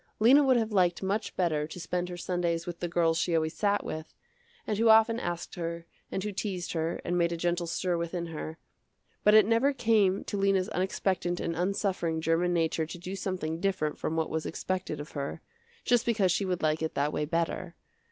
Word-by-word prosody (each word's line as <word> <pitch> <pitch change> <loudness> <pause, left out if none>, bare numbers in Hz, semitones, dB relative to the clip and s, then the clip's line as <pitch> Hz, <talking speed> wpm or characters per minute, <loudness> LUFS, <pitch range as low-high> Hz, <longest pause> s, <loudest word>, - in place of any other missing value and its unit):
Lena 260 +7 +6
would 260 -2 +4
have 225 -1 0
liked 180 -3 +2
much 205 +3 -2
better 155 -5 0
to 170 - -9
spend 180 +1 -2
her 175 - -6
Sundays 170 -2 -1
with 175 -1 -6
the 175 - -2
girls 165 -1 +2
she 175 -1 +1
always 160 0 +1
sat 205 -1 +1
with, 155 0 -6 0.5
and 210 -1 -2
who 230 0 +4
often 225 +1 +6
asked 175 -4 -4
her, 170 -1 -4 0.3
and 190 - -2
who 210 - -2
teased 190 -3 -3
her 165 0 -1
and 175 0 0
made 170 0 +2
a 170 - -2
gentle 175 0 -1
stir 175 +1 -1
within 170 +1 -3
her, 160 -1 -6 0.7
but 210 +1 +6
it 215 -2 +8
never 230 +6 +3
came 215 -6 +2
to 205 - -4
Lena's 195 0 +2
unexpectant 185 -2 -1
and 165 - -2
unsuffering 180 -2 -1
german 165 +2 +1
nature 165 -2 0
to 175 - -7
do 180 +3 -6
something 180 -4 -3
different 185 -6 0
from 160 - -3
what 160 -1 -1
was 160 0 -2
expected 185 -3 -3
of 145 - -8
her, 140 +2 -4 0.5
just 245 -2 +3
because 210 -6 +2
she 195 - +1
would 180 -3 -2
like 155 0 +1
it 160 - -2
that 145 +2 0
way 150 - -1
better. 170 +2 -2
175 Hz, 210 wpm, -29 LUFS, 165-195 Hz, 0.7 s, it